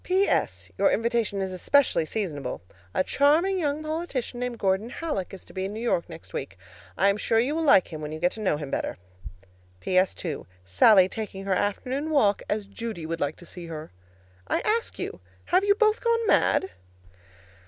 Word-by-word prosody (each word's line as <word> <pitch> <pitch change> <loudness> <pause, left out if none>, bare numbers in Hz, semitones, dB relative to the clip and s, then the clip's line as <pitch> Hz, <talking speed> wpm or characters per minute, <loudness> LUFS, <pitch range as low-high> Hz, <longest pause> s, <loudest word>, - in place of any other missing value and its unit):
P.S. 380 +2 +1
Your - - +5
invitation 230 -4 0
is 190 -1 -4
especially 215 - +3
seasonable. 155 - -4 0.3
A 185 - +1
charming 320 - +3
young 300 -1 -1
politician 310 -6 -3
named 250 -1 -3
Gordon 195 +2 0
Hallock 295 - -3
is 195 - -10
to - - -15
be 190 0 -2
in 195 - -4
New - - -5
York 230 -8 0
next 165 -1 -11
week. 130 -8 -5 0.4
I 195 - +4
am 200 - +1
sure 225 +2 +1
you 250 +6 +2
will 325 - -1
like 275 - +5
him 155 -2 -7
when 150 0 -5
you 155 - -5 0.2
know 200 -8 0
him 145 -2 -6
better. - - -2 0.8
P.S. 185 - +2
2. 160 -6 -5 0.2
Sallie 185 - +6
taking 195 -2 -6
her 195 - +1
afternoon 255 +10 -1
walk 215 -10 +3
as 210 -1 -1
Judy 200 -4 -6
would 165 +1 -3
like 145 +1 0
to 175 - -15
see 175 0 -8
her: 155 -1 -7 0.6
I - - 0
ask 450 +2 -1
you - - -2
again, - - -10 0.3
have 365 +2 +3
you 405 0 +4
both 430 0 +2
gone 465 -1 +2
mad? 190 - +3
210 Hz, 190 wpm, -26 LUFS, 185-290 Hz, 0.8 s, Sallie